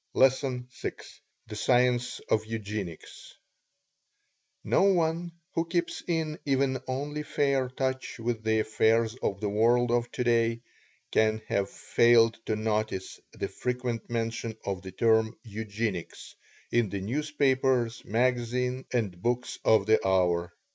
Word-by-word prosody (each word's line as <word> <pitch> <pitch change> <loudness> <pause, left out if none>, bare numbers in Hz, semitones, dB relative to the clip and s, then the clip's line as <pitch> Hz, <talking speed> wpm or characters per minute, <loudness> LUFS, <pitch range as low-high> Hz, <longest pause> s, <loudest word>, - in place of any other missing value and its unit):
LESSON 130 -1 +2
VI - - -4 0.5
THE 105 - -8
SCIENCE 125 +1 +2
OF 110 - +3
EUGENICS 105 -6 -6 1.3
No - - +2
one 170 -3 +2 0.2
who 165 0 0
keeps 170 0 -1
in 160 -3 -1
even 135 -1 +1
only 145 +3 -3
fair 140 -3 0
touch 130 0 -3
with 115 -1 -2
the 110 0 +2
affairs 110 +1 +2
of 100 - -1
the 105 - -1
world 120 +3 +3
of 120 0 +1
today 115 -1 +1 0.5
can 110 0 +3
have 100 -1 0
failed 115 -1 +4
to 110 - +1
notice 110 -3 -2
the - - -3
frequent 125 -2 -3
mention 115 -1 -3
of 95 -2 -2
the 95 -1 -8
term 110 +2 +2
"Eugenics" 105 -3 -4 0.4
in 120 -3 +2
the 100 - -3
newspapers, 130 -1 +1
magazine, 125 +2 0
and 100 -8 -1
books 125 +2 -1
of 110 -3 +4
the 110 +1 +3
hour. 90 -2 +2
120 Hz, 125 wpm, -28 LUFS, 110-130 Hz, 1.3 s, failed